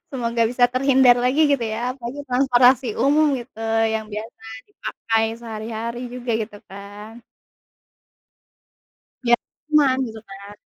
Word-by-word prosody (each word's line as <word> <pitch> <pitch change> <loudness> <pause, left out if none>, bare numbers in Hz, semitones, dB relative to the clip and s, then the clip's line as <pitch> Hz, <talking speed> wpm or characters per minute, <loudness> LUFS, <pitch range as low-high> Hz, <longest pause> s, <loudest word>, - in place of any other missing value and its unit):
Semoga 235 -3 -1
bisa 245 0 +3
terhindar 260 -1 +5
lagi 265 +5 +2
gitu 280 -3 +2
ya, 245 +3 -2
apalagi 255 +2 -7
transportasi 250 0 +4 0.2
umum 295 +3 +4
gitu, 235 -2 -13 0.3
yang 220 0 -2
biasa 220 +3 -7 0.3
dipakai 225 - -2 0.2
sehari-hari 230 +1 -5
juga, 245 -1 -5
gitu 210 -1 -9
kan. 205 +3 -11 2.1
Ya, 240 - +5 0.3
cuman 295 -4 +4
gitu 220 -1 -9
kan. 200 +1 -11
240 Hz, 120 wpm, -22 LUFS, 220-260 Hz, 2.1 s, terhindar